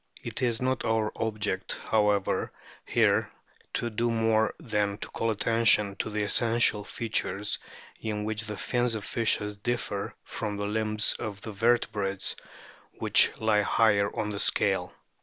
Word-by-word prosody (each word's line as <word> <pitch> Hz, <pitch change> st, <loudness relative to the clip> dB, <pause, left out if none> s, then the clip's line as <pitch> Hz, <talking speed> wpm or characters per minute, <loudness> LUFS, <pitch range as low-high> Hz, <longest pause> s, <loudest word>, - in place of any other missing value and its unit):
It -, -, -5 dB
is 120 Hz, -3 st, +1 dB
not 130 Hz, 0 st, -1 dB
our 110 Hz, -1 st, 0 dB
object, 105 Hz, -4 st, -2 dB
however, 105 Hz, -2 st, +1 dB, 0.4 s
here -, -, +2 dB, 0.4 s
to 120 Hz, -, -2 dB
do 120 Hz, +2 st, 0 dB
more 110 Hz, -1 st, +1 dB
than 105 Hz, -2 st, -1 dB
to -, -, -6 dB
call 115 Hz, -, -2 dB
attention 110 Hz, -2 st, +3 dB
to -, -, -2 dB
the 105 Hz, 0 st, -1 dB
essential 115 Hz, 0 st, +2 dB
features 105 Hz, -3 st, -2 dB, 0.4 s
in 105 Hz, -2 st, -3 dB
which 110 Hz, 0 st, -3 dB
the 105 Hz, -1 st, -5 dB
fins 120 Hz, -2 st, 0 dB
of 105 Hz, -3 st, -5 dB
fishes 105 Hz, -2 st, 0 dB
differ 105 Hz, -2 st, -3 dB
from 105 Hz, -2 st, -4 dB
the 100 Hz, -, -2 dB
limbs 105 Hz, 0 st, +3 dB
of 105 Hz, -3 st, -5 dB
the 110 Hz, -, -6 dB
vertebrates 105 Hz, -3 st, +1 dB, 0.6 s
which -, -, +5 dB
lie 110 Hz, -1 st, +3 dB
higher 100 Hz, -1 st, +3 dB
in 105 Hz, -, -1 dB
the 100 Hz, -1 st, -2 dB
scale. -, -, +1 dB
110 Hz, 145 wpm, -28 LUFS, 105-115 Hz, 0.6 s, which